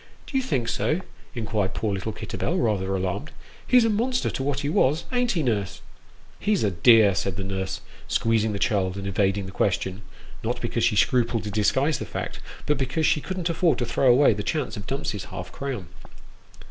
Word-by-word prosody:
" - - -28
Do - - -9
you 265 - +3
think 130 - -1
so? 155 +8 0 0.2
" - - -25
inquired 110 -5 -1
poor 105 -2 -1
little 100 +3 -3
Kitterbell, - - -3
rather 95 -4 0
alarmed. 95 - -2 0.2
" - - -24
He's 250 -2 +6
a - - +3
monster 245 +4 0
to - - -4
what 140 0 -1
he 145 - -2
was 150 +1 +2
ain't 245 -2 +1
he, 165 -4 0
nurse? 105 -7 -1 0.2
" - - -29
" - - -26
He's 210 -2 +1
a 105 - +2
dear," 105 +2 +6
said 95 +1 -2
the 100 - -3
nurse, 95 0 -3 0.3
squeezing 110 -1 +1
the 100 - -2
child, 100 -4 +1
and 100 - -5
evading 100 0 +1
the 95 - -7
question 95 +1 -1 0.4
not 120 +2 -1
because 115 -1 -1
she 110 - +3
scrupled 120 0 +2
to 105 - -4
disguise 130 +7 +2
the - - -4
fact, - - -5 0.3
but 145 -1 +1
because 135 +4 0
she 150 -1 +3
couldn't 185 0 -3
afford 165 0 +2
to 120 - -1
throw 125 +2 +3
away 130 0 +5
the 105 - -4
chance 135 -2 -2
of 105 -1 -8
Dumps's 115 -7 -3
half - - -7
crown. 130 -10 -5
115 Hz, 215 wpm, -25 LUFS, 100-145 Hz, 0.4 s, He's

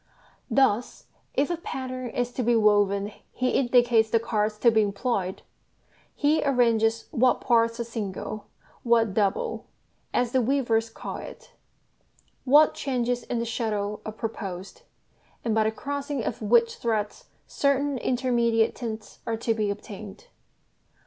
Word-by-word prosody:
Thus, 250 -3 +1 0.3
if 285 +4 +1
a 345 - -1
pattern 260 - -5
is 245 +1 -2
to 250 - -3
be 240 0 +2
woven 205 -2 +3 0.2
he 255 0 0
indicates 240 -3 +3
the 230 - +3
cards 215 -1 -1
to 235 +2 +4
be 220 -1 +4
employed, 200 -2 -2 0.7
he 300 +2 +2
arranges 230 -4 +2
what 250 +1 +3
parts 230 -1 +2
are - - 0
"single," 215 -2 -5 0.3
what 230 -4 +2
"double," 200 -1 -1 0.4
as 245 -1 0
the 260 - +3
weavers 235 -3 +1
call - - -7
it, - - -11 0.9
what 295 +4 +6
changes 245 -2 -1
in 245 - -2
the 230 - -1
shuttle 210 -3 -2
are 215 - -5
proposed, 205 - -6 0.6
and 225 - +1
by 220 0 +3
the 220 - +2
crossing 285 +1 -4
of 225 - -4
which 230 +2 +3
threads 215 -3 -2 0.2
certain 280 -1 0
intermediate 235 -3 +1
tints 220 -3 -7
are 225 -1 -1
to 230 0 0
be 215 -2 -1
obtained. 205 - -8
230 Hz, 140 wpm, -26 LUFS, 215-250 Hz, 0.9 s, what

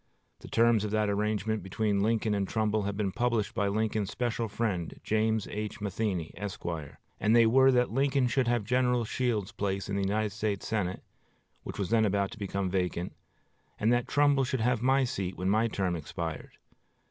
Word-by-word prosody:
The - - -11
terms 115 -2 +3
of 105 - -2
that 105 -1 +1
arrangement 105 +1 -1
between 100 +2 0
Lincoln 110 0 +1
and 100 -1 0
Trumbull 110 0 0
have 100 0 -3
been 100 -3 0
published 120 -1 0
by 100 - 0
Lincoln's 110 0 0
special 120 0 -2
friend, 100 -6 -2
James 110 0 +1
H. 105 0 -4
Matheny, 100 -4 -2
Esq.; 100 0 -6 0.5
and 110 +2 +3
they 115 -1 +7
were 130 +4 +5
that 125 -3 +2
Lincoln 135 +1 +2
should 125 +1 +1
have 120 -2 +1
General 125 +1 +1
Shields' 110 -4 -1
place 100 -1 -3
in 100 - -1
the 100 - 0
United 105 +2 0
States 105 -1 -2
Senate, 95 -5 -2 0.6
which - - -7
was 100 -1 -2
then 110 -1 +4
about 100 -1 0
to 115 - -10
become 100 -1 -2
vacant, 90 -1 -2 0.7
and 110 +3 +3
that 120 0 +1
Trumbull 145 -1 +3
should 130 -1 -1
have 120 0 +1
my 135 +2 +3
seat 95 -7 -3
when 95 +1 0
my 110 +2 +3
term 95 -5 -1
expired. 80 0 -6
110 Hz, 185 wpm, -29 LUFS, 100-115 Hz, 0.7 s, they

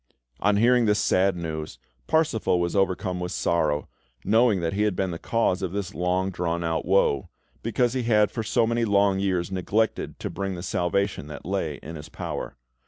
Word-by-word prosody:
On 100 0 +2
hearing 120 +1 +4
this 105 0 +3
sad 95 -2 +2
news, 80 -5 -5 0.3
Parsifal 150 - +2
was 85 +2 -1
overcome 95 -1 0
with 90 0 -3
sorrow, 75 -4 0 0.4
knowing 110 -2 +4
that 85 +1 -1
he 100 - -1
had 105 -3 +1
been 95 -1 -1
the 85 - -5
cause 115 -5 0
of 95 -2 -3
this 100 -3 -3
long 90 +3 0
drawn 85 -1 -2
out 80 -1 -1
woe, 90 -8 +2 0.3
because 120 +2 +1
he 130 - 0
had 105 -3 +3
for 115 - -3
so 115 +1 +2
many 115 +1 0
long 100 -2 +3
years 95 -2 0
neglected 105 +4 -1
to - - -5
bring 95 -1 -3
the 85 - -7
salvation 95 -2 -1
that 75 -2 -9
lay - - -2
in 80 +1 -7
his 75 - -10
power. - - -5
95 Hz, 190 wpm, -25 LUFS, 85-105 Hz, 0.4 s, hearing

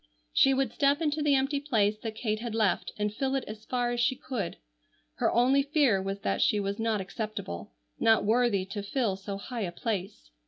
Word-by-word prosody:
She 270 - +5
would 265 -4 0
step 280 0 +3
into 305 -1 0
the 295 -1 +4
empty 275 +2 +1
place 215 -7 +1
that 220 -1 -5
Kate 215 -2 -1
had 230 -1 -4
left 215 -4 +1
and 210 0 -1
fill 270 +4 -1
it 270 - 0
as 215 +1 -8
far 245 -1 0
as 240 - -2
she 245 +2 +2
could. 230 -9 -4 0.6
Her - - +2
only 260 +4 +4
fear 275 -8 +2
was 195 +1 -4
that 95 0 0
she 210 - +3
was 200 +1 -2
not 225 -2 +1
acceptable, 200 - -5 0.3
not 225 -2 +4
worthy 220 -3 +2
to 195 +2 -5
fill 205 0 0
so 195 +1 -6
high 235 +3 -5
a 180 -4 -2
place. 195 - -4
225 Hz, 205 wpm, -29 LUFS, 200-260 Hz, 0.6 s, She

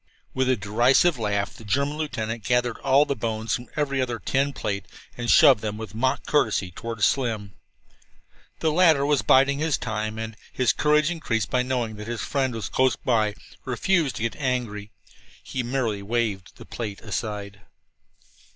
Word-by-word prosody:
With 130 0 +1
a 130 - +4
derisive 120 - +3
laugh 100 -2 -1
the - - -13
German 140 +7 0
lieutenant 115 -7 -3
gathered 125 0 0
all 140 +2 +4
the 140 - -2
bones 110 -1 -2
from 120 0 -3
every 140 -3 0
other 120 -2 -2
tin 135 +6 0
plate 100 -6 -4 0.3
and 120 -1 -4
shoved 140 -9 +7
them, 105 -1 -3
with 110 -1 -7
mock 130 +4 0
courtesy, 110 -10 +1
toward 115 +3 -5
Slim. 110 -7 0 1.1
The 160 - +2
latter 160 -4 +4
was 145 -2 +2
biding 140 +2 +4
his 155 -2 +1
time, 110 -1 -3
and, 110 0 -5 0.2
his 125 -6 +2
courage 150 +1 +2
increased 115 - -2
by 125 - +2
knowledge 125 -4 -2
that 105 +1 -8
his 120 -1 -3
friend 130 -4 -1
was 110 - -4
close 130 0 +2
by, 110 -4 0 0.3
refused 145 +3 +1
to - - -4
get 115 - -1
angry. 120 -7 -2 0.5
He 130 - -3
merely 120 -4 -1
waved 105 -3 -2
the - - -12
plate 105 -4 -6
aside. 105 -2 -5
120 Hz, 170 wpm, -25 LUFS, 110-135 Hz, 1.1 s, shoved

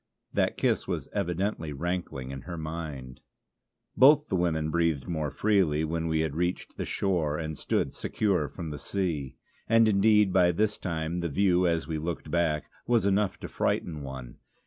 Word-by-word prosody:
That - - +1
kiss - - +1
was - - -3
evidently 90 -3 -1
rankling 70 -4 -3
in 70 -1 -6
her 85 - -4
mind. 80 -5 -6 0.7
Both 150 +3 +6
the - - 0
women 80 -3 0
breathed 80 -5 +1
more 80 -4 -1
freely 90 -6 +2
when 80 +1 -1
we 80 -1 +1
had 80 -2 -2
reached 90 +2 -2
the - - -3
shore 85 -6 0
and 80 -1 -4
stood - - -1
secure 95 -8 0
from 80 -1 -7
the 75 - -6
sea. 80 -8 -2 0.3
And 115 0 +6
indeed 105 -1 +4
by 90 -2 +4
this 105 +4 0
time 85 -1 -2
the 85 -1 -2
view, 90 +3 +3
as 85 -2 0
we 80 -1 -2
looked 80 -1 -4
back, 80 -3 +1 0.2
was 115 -4 +3
enough 100 0 +1
to - - -5
frighten 80 -4 -1
one. 65 -3 -8
85 Hz, 170 wpm, -28 LUFS, 75-95 Hz, 0.7 s, Both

